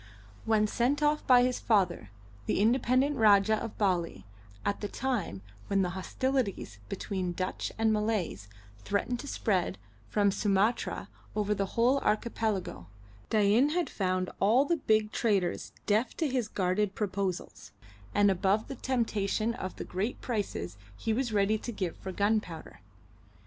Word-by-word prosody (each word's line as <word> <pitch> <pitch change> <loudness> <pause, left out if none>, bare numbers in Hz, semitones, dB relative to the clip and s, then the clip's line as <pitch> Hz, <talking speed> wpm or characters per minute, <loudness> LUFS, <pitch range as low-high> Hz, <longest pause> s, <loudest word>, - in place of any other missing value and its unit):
When 220 -1 +3
sent 255 +7 +1
off 300 0 +1
by 250 -1 +7
his 250 0 0
father, 180 - +1 0.4
the - - +1
independent 255 +5 +3
Rajah 215 0 +5
of 230 - -6
Bali, 175 - 0 0.4
at 200 - -1
the 205 - -2
time 205 - -3 0.2
when 195 -1 +2
the 180 - -1
hostilities 200 - -2
between 185 - -3
Dutch 185 +1 -3
and 220 0 +3
Malays 210 - -1 0.3
threatened 205 - -1
to 285 - -7
spread 185 - 0 0.3
from 205 -1 +3
Sumatra 205 +3 0 0.3
over 210 -1 +1
the 195 -1 -1
whole 250 +4 +4
archipelago, 210 - -1 0.4
Dain 215 +6 +4
had 345 +2 -1
found 185 -2 -1
all 225 +8 +4
the 340 +3 +1
big 215 -6 +2
traders 200 -6 0
deaf 220 +4 +1
to 320 - +1
his 250 -5 -1
guarded 195 0 0
proposals, 195 -3 -3 0.4
and 205 -1 +4
above 195 +3 +1
the 275 - -4
temptation 225 -3 0
of 185 -5 -5
the - - -6
great 200 +7 -3
prices 195 - -3 0.2
he 220 - -1
was 245 0 -1
ready 210 +1 +2
to 240 - -5
give 185 -6 -3
for 190 - -6
gunpowder. 200 -4 -1
210 Hz, 145 wpm, -30 LUFS, 190-235 Hz, 0.4 s, by